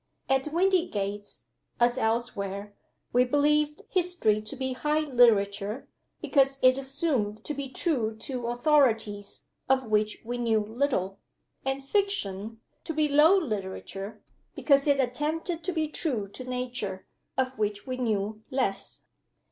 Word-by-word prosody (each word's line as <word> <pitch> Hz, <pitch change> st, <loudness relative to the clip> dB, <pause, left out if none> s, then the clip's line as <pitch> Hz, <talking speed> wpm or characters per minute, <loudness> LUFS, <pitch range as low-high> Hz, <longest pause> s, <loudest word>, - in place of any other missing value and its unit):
At 270 Hz, +2 st, +1 dB
Windygates, 295 Hz, -, 0 dB, 0.4 s
as 240 Hz, 0 st, +4 dB
elsewhere, 210 Hz, -4 st, -2 dB, 0.4 s
we 250 Hz, -, +5 dB
believed 295 Hz, +3 st, +2 dB
History 350 Hz, -, +1 dB
to 215 Hz, +5 st, -6 dB
be 260 Hz, -1 st, -2 dB
high 300 Hz, +4 st, 0 dB
literature, 220 Hz, -5 st, +2 dB, 0.3 s
because 275 Hz, -1 st, +3 dB
it 255 Hz, 0 st, +7 dB
assumed 270 Hz, -6 st, -1 dB
to 300 Hz, -, -4 dB
be 280 Hz, -1 st, -4 dB
true 250 Hz, -6 st, 0 dB
to 245 Hz, 0 st, -4 dB
Authorities 235 Hz, -6 st, +1 dB, 0.3 s
(of 265 Hz, -1 st, +3 dB
which 215 Hz, -1 st, +1 dB
we 245 Hz, +1 st, -3 dB
knew 225 Hz, -2 st, +2 dB
little) 215 Hz, -4 st, -1 dB, 0.4 s
and 270 Hz, +1 st, -2 dB
Fiction 225 Hz, -, -1 dB, 0.2 s
to 320 Hz, -, -4 dB
be 305 Hz, -1 st, +3 dB
low 300 Hz, +6 st, +6 dB
literature, 205 Hz, -, -4 dB, 0.3 s
because 280 Hz, -1 st, +3 dB
it 285 Hz, -1 st, +4 dB
attempted 310 Hz, +6 st, -1 dB
to 370 Hz, -, 0 dB
be 315 Hz, -3 st, 0 dB
true 260 Hz, -, -2 dB
to 255 Hz, -, -8 dB
Nature 245 Hz, -7 st, -4 dB, 0.3 s
(of 260 Hz, 0 st, 0 dB
which 205 Hz, -1 st, -1 dB
we 255 Hz, -, -3 dB
knew 215 Hz, -3 st, -1 dB
less). 255 Hz, -7 st, -2 dB
250 Hz, 130 wpm, -28 LUFS, 215-290 Hz, 0.4 s, it